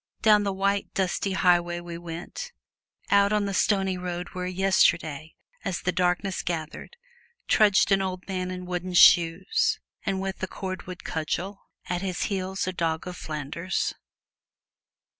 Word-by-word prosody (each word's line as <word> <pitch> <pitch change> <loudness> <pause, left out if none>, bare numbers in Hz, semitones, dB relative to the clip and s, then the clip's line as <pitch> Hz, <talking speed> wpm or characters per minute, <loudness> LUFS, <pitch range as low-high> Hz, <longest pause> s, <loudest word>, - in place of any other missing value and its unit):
Down 210 -2 +6
the 200 -1 0
white, 200 +1 0
dusty 190 +1 0
highway 175 -2 +2
we 175 -1 -8
went; 175 - -7 0.6
out 200 0 +5
on 210 -1 +2
the 200 - -2
stony 190 -2 +1
road 180 0 -4
where 180 0 -4
yesterday, 170 -5 +1 0.3
as 185 -3 -2
the 180 - 0
darkness 180 +1 0
gathered, 165 - -5 0.5
trudged 205 -2 +4
an 195 0 +4
old 185 -1 -4
man 185 -2 -2
in 180 0 -6
wooden 180 0 -4
shoes 175 - +5 0.2
and 195 -2 -1
with 190 0 -4
a 190 - -1
cordwood 185 -1 -6
cudgel 175 +5 -4 0.2
at 180 0 -2
his 185 -2 -2
heels 190 0 -2
a 185 - -3
dog 165 -1 -1
of 180 - -5
Flanders. 155 +4 -3
185 Hz, 145 wpm, -26 LUFS, 175-195 Hz, 0.6 s, Down